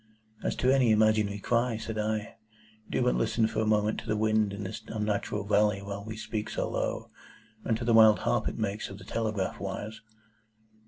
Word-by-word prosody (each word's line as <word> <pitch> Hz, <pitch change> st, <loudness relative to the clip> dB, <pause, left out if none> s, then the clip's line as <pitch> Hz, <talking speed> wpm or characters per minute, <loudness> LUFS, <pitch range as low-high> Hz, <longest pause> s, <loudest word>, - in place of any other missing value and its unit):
"As -, -, -1 dB
to 130 Hz, +1 st, +3 dB
an 135 Hz, -, +4 dB
imaginary 110 Hz, -3 st, +3 dB
cry," 120 Hz, +2 st, 0 dB
said 110 Hz, 0 st, -5 dB
I, 105 Hz, 0 st, -2 dB, 0.6 s
"do -, -, 0 dB
but -, -, +3 dB
listen -, -, +1 dB
for 110 Hz, 0 st, -2 dB
a 110 Hz, -, 0 dB
moment 105 Hz, 0 st, +2 dB
to -, -, -11 dB
the 105 Hz, -, 0 dB
wind 110 Hz, -1 st, +2 dB
in 100 Hz, +1 st, -5 dB
this 95 Hz, +3 st, -6 dB
unnatural 105 Hz, -1 st, -2 dB
valley 105 Hz, -1 st, +3 dB
while 100 Hz, 0 st, -6 dB
we 110 Hz, +1 st, -7 dB
speak 110 Hz, -1 st, -4 dB
so -, -, -2 dB
low, -, -, -3 dB, 0.5 s
and 110 Hz, -, 0 dB
to 115 Hz, -, -5 dB
the 115 Hz, -, +3 dB
wild 110 Hz, -1 st, +8 dB
harp 120 Hz, -3 st, +1 dB
it -, -, -3 dB
makes 105 Hz, -1 st, -2 dB
of 95 Hz, -, -9 dB
the -, -, -12 dB
telegraph 110 Hz, -4 st, -2 dB
wires." 105 Hz, +2 st, -5 dB
110 Hz, 200 wpm, -29 LUFS, 105-110 Hz, 0.6 s, wild